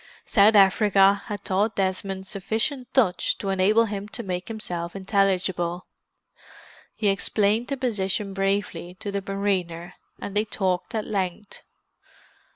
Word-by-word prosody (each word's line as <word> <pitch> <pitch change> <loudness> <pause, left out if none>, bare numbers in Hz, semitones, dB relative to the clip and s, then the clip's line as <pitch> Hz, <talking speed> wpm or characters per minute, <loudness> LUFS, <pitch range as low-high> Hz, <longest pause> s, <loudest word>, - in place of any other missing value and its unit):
South 210 +1 +5
Africa 195 0 +5
had 205 -1 -6
taught 205 +4 +1
Desmond 190 0 -2
sufficient 225 +7 -2
Dutch 215 -10 +2
to 195 - -4
enable 200 +4 +3
him 205 -1 -5
to 235 - -5
make 180 -2 -4
himself 175 -6 -5
intelligible. 190 -3 0 1.1
He 215 - -1
explained 210 +3 +1
the 275 - -3
position 205 -5 -1
briefly 195 -3 -2
to 200 +2 -6
the 200 0 -2
mariner, 185 -3 -2 0.3
and 200 - -6
they 210 +1 +2
talked 190 -1 -2
at 215 - -1
length. 195 0 -4
195 Hz, 130 wpm, -25 LUFS, 190-210 Hz, 1.1 s, South